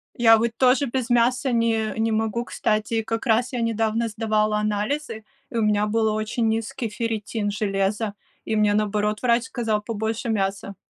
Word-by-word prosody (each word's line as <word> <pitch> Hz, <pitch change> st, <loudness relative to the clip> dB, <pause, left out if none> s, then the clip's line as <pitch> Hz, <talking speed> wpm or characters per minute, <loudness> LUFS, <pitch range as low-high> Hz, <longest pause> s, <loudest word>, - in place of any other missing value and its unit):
Я 225 Hz, -1 st, +6 dB
вот 230 Hz, +1 st, 0 dB
тоже 260 Hz, +2 st, +4 dB
без 255 Hz, -1 st, -3 dB
мяса 250 Hz, +3 st, +2 dB
не 230 Hz, -2 st, +1 dB
не 225 Hz, 0 st, +1 dB
могу, 220 Hz, +2 st, -1 dB
кстати. 215 Hz, +1 st, -1 dB
Как 225 Hz, +2 st, -3 dB
раз 235 Hz, +1 st, +2 dB
я 245 Hz, -2 st, -2 dB
недавно 225 Hz, 0 st, 0 dB
сдавала 215 Hz, -1 st, 0 dB
анализы, 215 Hz, +3 st, -2 dB, 0.2 s
и 235 Hz, -, -4 dB
у -, -, +2 dB
меня 210 Hz, 0 st, +2 dB
был 220 Hz, 0 st, +1 dB
очень 220 Hz, +2 st, -1 dB
низкий 225 Hz, +1 st, -2 dB
ферритин 220 Hz, -1 st, -3 dB
железа, 205 Hz, +1 st, -1 dB, 0.3 s
и 220 Hz, -, -1 dB
мне, 210 Hz, -1 st, +3 dB
наоборот, 210 Hz, 0 st, 0 dB
врач 235 Hz, 0 st, +3 dB
сказал 225 Hz, -5 st, -1 dB
побольше 220 Hz, +2 st, -3 dB
мяса. 200 Hz, -2 st, -2 dB
220 Hz, 165 wpm, -23 LUFS, 210-235 Hz, 0.3 s, Я